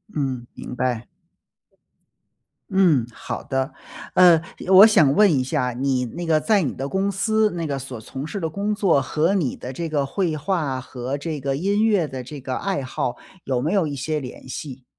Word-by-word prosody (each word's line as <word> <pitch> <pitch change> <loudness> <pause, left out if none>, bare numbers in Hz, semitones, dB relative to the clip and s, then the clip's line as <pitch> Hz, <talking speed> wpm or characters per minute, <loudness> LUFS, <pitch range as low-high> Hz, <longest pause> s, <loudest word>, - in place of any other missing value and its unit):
嗯， 130 -4 -2
明 125 - -7
白。 125 -2 -2 1.6
嗯， 175 -10 +4
好 - - -6
的。 135 +1 -2 0.4
呃， 175 -3 +7 0.3
我 190 +2 +9
想 155 -11 +5
问 210 -4 +6
一 - - 0
下， 125 -1 -1
你 130 0 0
那 170 +10 -6
个 155 -1 +3
在 210 +2 +3
你 145 - -1
的 135 +1 -4
公 195 +4 0
司， 215 +2 +2
那 165 -1 -2
个 140 -2 -2
所 125 -3 -7
从 135 +6 -7
事 200 - -4
的 165 - -1
工 200 +6 -2
作 180 -9 +3
和 155 +7 +1
你 165 -10 0
的 130 +1 -7
这 165 +3 -4
个 145 -3 0
绘 160 +1 -1
画 150 -5 -1
和 130 +2 -5
这 155 0 -4
个 135 0 -2
音 200 +5 +1
乐 200 -8 +3
的 130 -2 -6
这 145 +3 -8
个 130 0 -4
爱 190 -9 -2
好， 125 -1 -3 0.3
有 130 -2 -1
没 155 +9 -1
有 185 -6 +2
一 145 - -4
些 150 +3 -2
联 130 -1 -9
系？ 130 -1 -7
150 Hz, 210 characters per minute, -23 LUFS, 130-185 Hz, 1.6 s, 我